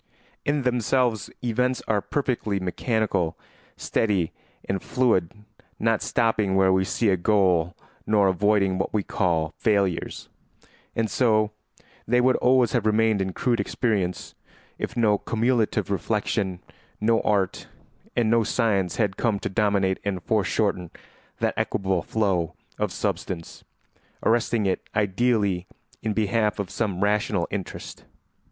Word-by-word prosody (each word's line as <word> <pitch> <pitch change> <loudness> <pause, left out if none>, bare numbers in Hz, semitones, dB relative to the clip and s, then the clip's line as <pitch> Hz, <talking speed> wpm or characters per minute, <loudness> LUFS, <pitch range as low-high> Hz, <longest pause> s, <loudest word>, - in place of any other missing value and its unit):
In 145 -1 +1
themselves 125 -2 +1
events 125 +2 0
are 105 -2 +1
perfectly 120 -8 -1
mechanical, 95 -2 -1 0.4
steady, 100 -7 0 0.4
and 95 -1 -1
fluid, 115 -10 +1 0.5
not 115 -1 +1
stopping 110 -4 +1
where 95 -1 +4
we 95 0 +2
see 110 +3 +1
a 95 - +3
goal 90 -3 +2 0.3
nor 105 -2 +4
avoiding 95 0 +2
what 95 - -2
we 105 - +1
call 80 -5 0
failures. 100 -5 0 0.7
And 115 -1 +1
so 110 -3 +2 0.6
they 125 +2 +3
would 130 +1 +4
always 125 -1 +3
have 120 -5 +1
remained 110 -1 +3
in 95 0 -1
crude 120 +3 0
experience, 100 -7 -1 0.5
if 115 - -4
no 105 -3 +3
cumulative 115 -2 0
reflection, 100 -2 -1 0.4
no 115 +1 +3
art, 100 -3 0 0.5
and 120 -2 +2
no 115 +1 +3
science 100 -7 +1
had 100 -2 0
come 115 -4 +1
to - - -2
dominate 100 -2 +1
and 95 -4 -3
foreshorten 100 -3 0 0.5
that - - 0
equable 95 -2 0
flow 95 -7 0 0.2
of - - 0
substance, 85 -3 -4 0.6
arresting 115 -2 +2
it 95 - 0
ideally 100 -3 +1 0.3
in 110 -1 -1
behalf 110 0 +1
of 100 -3 -4
some 100 -5 -1
rational 100 -3 +1
interest. 95 -3 -6
105 Hz, 130 wpm, -25 LUFS, 95-115 Hz, 0.7 s, where